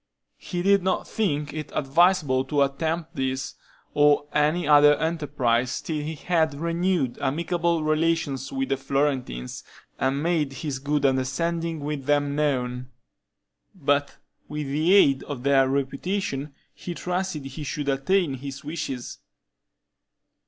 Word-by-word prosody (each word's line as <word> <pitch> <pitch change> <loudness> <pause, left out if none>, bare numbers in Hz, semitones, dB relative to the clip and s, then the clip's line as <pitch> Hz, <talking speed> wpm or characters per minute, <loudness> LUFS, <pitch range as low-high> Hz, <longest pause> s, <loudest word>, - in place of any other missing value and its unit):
He 175 -1 -4
did 200 0 +4
not 185 +1 -1
think 150 -9 -1
it 155 -1 -6
advisable 145 -2 +3
to 145 -2 +2
attempt 160 +4 -2
this, 130 0 -2 0.4
or 145 0 +4
any 150 +2 +2
other 145 0 +7
enterprise, 140 -6 0
till 155 -2 -3
he 160 +2 -4
had 160 -1 +1
renewed 170 -5 0
amicable 170 +2 0
relations 155 -3 0
with 135 0 -2
the 135 - +1
Florentines, 135 - -2 0.4
and 135 +2 0
made 160 -5 0
his 135 0 -4
good 145 +1 0
understanding 160 +5 0
with 145 -2 -4
them 145 0 +1
known; 130 -4 -1 0.9
but 145 -4 0 0.3
with 150 0 -4
the 155 +6 +1
aid 140 -9 +5
of 135 -4 -6
their 135 -1 +4
reputation 140 +1 -2 0.2
he 175 - -7
trusted 180 -5 -3
he 135 +3 -7
should 145 0 -4
attain 140 +4 +1
his 135 +1 -7
wishes. 145 -5 -5
145 Hz, 130 wpm, -25 LUFS, 135-165 Hz, 0.9 s, other